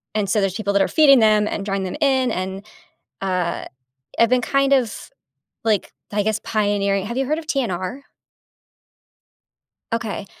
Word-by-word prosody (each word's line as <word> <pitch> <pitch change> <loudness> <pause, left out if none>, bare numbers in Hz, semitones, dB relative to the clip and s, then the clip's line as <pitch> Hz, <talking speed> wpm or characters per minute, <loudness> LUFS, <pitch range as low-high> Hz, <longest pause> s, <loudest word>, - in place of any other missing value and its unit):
and 210 -2 0
so, 210 +2 +2
there's 195 -1 0
people 200 -2 -1
that 200 - +3
are - - +3
feeding 280 -4 +6
them 215 -1 +4
and 200 - -3
drawing 195 -1 -1
them 185 - -4
in, 265 -4 +2
and, 190 +1 -4 0.6
uh, 185 -3 -1 0.5
I've 230 - +5
been 255 0 +3
kind 275 +1 +2
of, 245 -5 0 0.6
like, 215 -3 0 0.2
I 205 0 +1
guess, 220 +1 -1
pioneering 200 -2 0
Have 235 +3 -5
you 270 - 0
heard 305 +4 0
of 320 - -8
TNR? 240 - -2 1.9
Okay. 220 -3 -3
215 Hz, 160 wpm, -21 LUFS, 195-255 Hz, 1.9 s, feeding